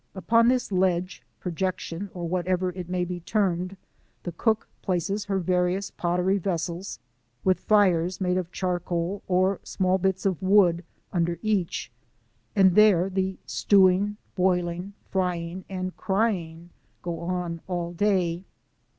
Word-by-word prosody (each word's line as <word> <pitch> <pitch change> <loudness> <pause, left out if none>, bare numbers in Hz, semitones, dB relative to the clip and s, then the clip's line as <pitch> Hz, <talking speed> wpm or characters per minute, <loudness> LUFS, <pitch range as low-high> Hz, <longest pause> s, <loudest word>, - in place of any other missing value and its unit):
Upon 230 +4 +3
this 250 -3 +1
ledge, 185 -1 0 0.2
projection, 185 +1 -3
or 175 -1 -3
what 180 +1 -2
ever 185 0 +1
it 180 -1 -7
may 180 -1 0
be 175 0 -5
termed, 185 0 -1 0.5
the 175 - -4
cook 220 +6 0
places 195 +2 -1
her 200 -1 -1
various 180 +2 0
pottery 180 +3 0
vessels 175 0 -3 0.5
with 185 -1 +3
fires 185 -4 +3
made 180 -1 +1
of 180 -1 -3
charcoal 180 +1 -2
or 185 +1 +2
small 185 0 0
bits 190 +1 0
of 190 -3 0
wood 185 -3 +4 0.3
under 170 -1 0
each, 205 -5 -1 0.6
and 190 -3 +5
there 195 -3 +5
the 190 0 -1
stewing, 200 +1 +3 0.2
boiling, 180 0 0 0.2
frying, 180 -1 -2
and 185 -1 -4
crying 175 -5 -1 0.3
go 170 -2 -3
on 170 -1 -3
all 175 -2 -3
day. 180 -2 +1
185 Hz, 135 wpm, -26 LUFS, 175-195 Hz, 0.6 s, and